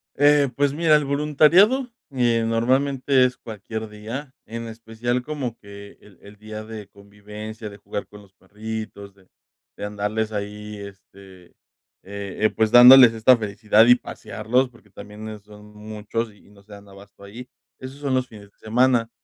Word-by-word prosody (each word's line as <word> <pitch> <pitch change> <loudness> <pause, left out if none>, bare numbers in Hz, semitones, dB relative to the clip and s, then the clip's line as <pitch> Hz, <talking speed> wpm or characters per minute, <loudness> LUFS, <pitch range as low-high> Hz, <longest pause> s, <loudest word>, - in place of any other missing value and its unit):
Eh, 145 0 +4
pues 140 -1 +1
mira, 155 0 +3
el 150 -1 +1
voluntariado, 155 - +3 0.2
eh, 120 -3 +1
normalmente 130 +3 +2
es 125 0 -2
cualquier 110 0 -7
día, 115 +7 -8
en 115 +1 -7
especial 115 +2 -4
como 130 -5 -5
que 100 -1 -13
el 100 -4 -20
el 100 +1 -15
día 110 0 -9
de 110 -2 -9
convivencia, 105 +2 -10
de 100 - -13
jugar 100 0 -6
con 105 0 -14
los 100 -2 -20
perritos, 105 0 -8
de 95 -2 -25 0.5
de - - -6
andarles 105 +1 -3
ahí, 105 0 -6
este, 95 -2 -14 0.6
eh 100 -1 -8
eh, - - +2
pues, 110 -1 +2
dándoles 125 -1 +9
esta 115 +3 +5
felicidad, 105 +1 +2
y 125 - +8
pasearlos, 125 +1 -2
porque, 115 -4 -23
también, 105 +2 -10
eh, 110 -1 -8
son 105 0 -16
muchos, 110 +1 -5
y 100 0 -22
no 100 -1 -19
se 105 +1 -16
dan 100 0 -14
abasto 100 0 -16
ahí. 120 +5 -11 0.3
Esos 130 +1 -9
son 140 -2 -2
los 130 0 0
fines 100 -3 -15
de - - -44
semana. 120 +1 +1
110 Hz, 170 wpm, -22 LUFS, 105-125 Hz, 0.6 s, dándoles